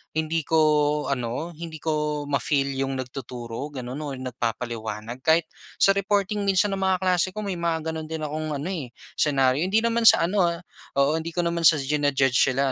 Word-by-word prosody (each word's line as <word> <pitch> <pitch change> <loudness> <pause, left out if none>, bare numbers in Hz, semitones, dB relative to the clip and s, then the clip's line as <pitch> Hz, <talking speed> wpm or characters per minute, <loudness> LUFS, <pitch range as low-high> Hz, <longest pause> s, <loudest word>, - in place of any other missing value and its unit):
hindi 160 0 -1
ko 160 - +2 0.5
ano, 125 +6 -3
hindi 165 -1 -7
ko 150 -2 -1
ma-feel 140 0 +1
'yung 135 0 -1
nagtuturo 125 -1 -6
gano'n, 130 +2 -5
or 145 -3 -4
nagpapaliwanag, 115 -2 -4
kahit 160 +1 +4 0.3
sa 195 - +5
reporting 200 +1 0
minsan 195 +1 +3
ng 195 - -2
mga 190 -1 +2
kaklase 185 0 +2
ko 215 - -4
may 190 -4 -3
mga 160 -1 -1
gano'n 160 -1 -5
din 160 0 -5
akong 155 0 -3
ano, 145 +6 -4
eh, 160 -9 -4 0.3
senaryo. 135 -2 +3
Hindi 215 +4 +2
naman 230 0 +3
sa - - +7
ano, 185 +2 +2
ah, 170 0 -3 0.4
oo 145 +3 +2
hindi 165 +1 -6
ko 175 - +2
naman 170 0 -1
sa 165 - +6
jina-judge 135 -2 +1 0.2
sila 135 +1 +1
155 Hz, 185 wpm, -25 LUFS, 135-170 Hz, 0.5 s, sa